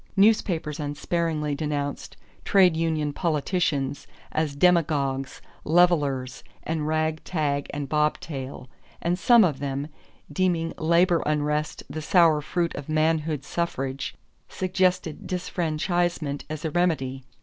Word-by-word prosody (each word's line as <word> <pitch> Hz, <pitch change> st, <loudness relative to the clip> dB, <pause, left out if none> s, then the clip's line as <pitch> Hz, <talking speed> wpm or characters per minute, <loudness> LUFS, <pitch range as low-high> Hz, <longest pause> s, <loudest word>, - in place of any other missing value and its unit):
Newspapers 180 Hz, -7 st, +2 dB
unsparingly 150 Hz, +1 st, -1 dB
denounced 145 Hz, -1 st, -3 dB, 0.3 s
"trade 185 Hz, -4 st, +5 dB
union 160 Hz, -3 st, 0 dB
politicians" 150 Hz, -3 st, -1 dB, 0.2 s
as 155 Hz, -2 st, -1 dB
"demagogues," 140 Hz, -5 st, +1 dB, 0.2 s
"levellers," 145 Hz, -6 st, +2 dB, 0.2 s
and 155 Hz, -2 st, -2 dB
"rag, 155 Hz, 0 st, 0 dB
tag, 145 Hz, -4 st, -1 dB
and 145 Hz, -1 st, -4 dB
bobtail"; 145 Hz, -3 st, -2 dB, 0.3 s
and 175 Hz, +2 st, -1 dB
some 235 Hz, +2 st, +6 dB
of 150 Hz, -7 st, +1 dB
them, 140 Hz, +1 st, -3 dB, 0.4 s
deeming 170 Hz, -1 st, 0 dB
labor 170 Hz, +2 st, +3 dB
unrest 150 Hz, 0 st, -1 dB
the 155 Hz, -, -5 dB
sour 160 Hz, -2 st, +4 dB
fruit 170 Hz, +3 st, -1 dB
of 145 Hz, +1 st, -7 dB
manhood 155 Hz, -2 st, +1 dB
suffrage, 135 Hz, -5 st, -3 dB, 0.3 s
suggested 185 Hz, -3 st, 0 dB
disfranchisement 175 Hz, -3 st, -1 dB
as 155 Hz, 0 st, -5 dB
a 160 Hz, -, -1 dB
remedy. 140 Hz, -7 st, 0 dB
155 Hz, 110 wpm, -25 LUFS, 145-170 Hz, 0.4 s, some